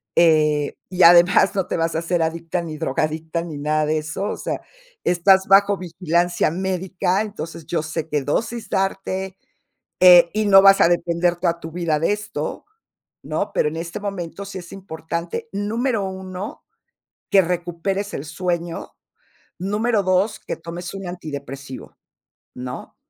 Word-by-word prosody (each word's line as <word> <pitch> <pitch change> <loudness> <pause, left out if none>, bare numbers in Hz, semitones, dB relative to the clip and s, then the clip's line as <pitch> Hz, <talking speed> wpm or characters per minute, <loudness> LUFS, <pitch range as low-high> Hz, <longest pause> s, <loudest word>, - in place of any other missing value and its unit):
eh, 150 -3 +3
y 185 -1 +2
además 175 +3 +7
no 190 -2 0
te - - -2
vas 165 0 -1
a - - +1
hacer 170 +1 -1
adicta, 165 +2 -2
ni 160 -2 -6
drogadicta, 160 +2 -2
ni 160 -4 -7
nada 150 +1 0
de 155 +1 +1
eso, 155 +5 -4
o - - -4
sea, - - -4 0.4
estás 190 +2 +4
bajo 200 +1 +5
vigilancia 175 -1 0
médica, 185 +1 -1
entonces 170 -7 -6
yo 165 0 -1
sé 155 0 -4
qué 150 -1 0
dosis 225 - -2
darte, 190 0 -2 0.6
eh, 175 -2 +8
y 215 +1 0
no 195 -1 +8
vas 195 0 +7
a - - +7
depender 175 0 +1
toda 170 -1 -1
tu 165 -1 -8
vida 165 -3 0
de 165 - +1
esto, 205 -7 -5 0.6
¿no? - - -3
Pero - - +2
en 155 - -6
este 170 +3 -5
momento 195 -2 -5
sí 200 -1 -7
es 175 -2 -11
importante, 170 -1 -5
número 215 +2 -1
1, 190 +1 -6 0.7
que 195 - +6
recuperes 180 +3 -2
el 140 - -4
sueño. 170 +1 -3 0.7
Número 210 +3 0
2, 185 +3 +1
que - - -5
tomes 170 +2 -7
un 195 -1 -6
antidepresivo, 140 -6 -8 0.6
¿no? 125 0 -7
175 Hz, 155 wpm, -21 LUFS, 160-195 Hz, 0.7 s, eh